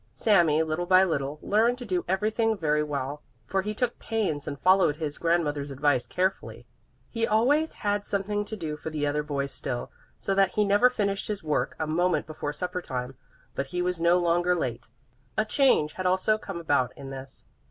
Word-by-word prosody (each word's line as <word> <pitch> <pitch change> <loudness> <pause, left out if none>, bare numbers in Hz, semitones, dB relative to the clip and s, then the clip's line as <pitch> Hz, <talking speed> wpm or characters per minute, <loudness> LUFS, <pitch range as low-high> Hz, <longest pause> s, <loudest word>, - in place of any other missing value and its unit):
Sami, 170 -7 +4
little 160 +3 -2
by 185 0 +6
little, 145 -5 -1
learned 230 +4 +2
to 250 - -7
do 185 -4 -1
everything 215 +4 +1
very 150 -3 +1
well, 145 -1 -3 0.2
for 195 - 0
he 210 +2 -4
took 245 +1 -1
pains 195 -11 -2
and 140 - -5
followed 185 -5 +4
his 150 -2 -5
grandmother's 150 -4 0
advice 135 -3 +1
carefully. 185 +6 -2 0.5
He 230 -1 0
always 280 +9 +2
had 205 0 +1
something 205 +1 -1
to 220 - -6
do 155 -5 -4
for 160 - -6
the 150 -2 -2
other 145 +1 0
boys 140 -2 -3
still, 125 -1 -4 0.3
so 195 - -2
that 195 -1 +3
he 210 - +3
never 205 +5 +5
finished 200 -5 -2
his 205 -4 -4
work 150 -1 -1
a 160 - -1
moment 175 +4 +1
before 155 -2 -4
supper 180 +3 -3
time. 125 -3 -5 0.4
But 140 - -3
he 180 +5 -2
was 180 -2 -2
no 170 +1 +5
longer 175 +1 +2
late. 120 -8 -3 0.5
A 215 - +2
change 220 - +3
had 185 -1 -2
also 190 +4 +2
come 195 -5 -6
about 140 -6 0
in 135 -1 -8
this. 135 0 -8
175 Hz, 195 wpm, -27 LUFS, 145-205 Hz, 0.5 s, by